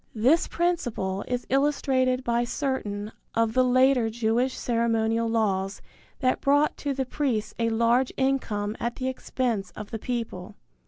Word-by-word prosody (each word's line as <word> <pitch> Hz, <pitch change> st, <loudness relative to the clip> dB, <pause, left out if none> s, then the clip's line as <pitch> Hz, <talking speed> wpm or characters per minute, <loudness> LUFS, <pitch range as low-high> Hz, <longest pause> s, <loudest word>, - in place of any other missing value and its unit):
This 260 Hz, +10 st, +3 dB
principle 240 Hz, -, -1 dB
is 245 Hz, 0 st, -2 dB
illustrated 265 Hz, -2 st, +1 dB
by 235 Hz, -1 st, +1 dB
certain 235 Hz, -5 st, -3 dB, 0.2 s
of 230 Hz, -1 st, +2 dB
the 255 Hz, -, +4 dB
later 255 Hz, -1 st, +4 dB
Jewish 235 Hz, +3 st, 0 dB
ceremonial 230 Hz, -1 st, +1 dB
laws 200 Hz, -3 st, 0 dB, 0.4 s
that 255 Hz, -1 st, +1 dB
brought 290 Hz, +2 st, +3 dB
to 285 Hz, -, -2 dB
the 265 Hz, 0 st, -1 dB
priests 240 Hz, -6 st, -1 dB
a 230 Hz, 0 st, +2 dB
large 235 Hz, +3 st, +2 dB
income 225 Hz, -6 st, 0 dB
at 235 Hz, 0 st, -2 dB
the 260 Hz, -, -3 dB
expense 245 Hz, -6 st, -2 dB
of 210 Hz, -1 st, -8 dB
the 225 Hz, -, -4 dB
people. 225 Hz, -7 st, -4 dB
240 Hz, 145 wpm, -26 LUFS, 220-260 Hz, 0.4 s, the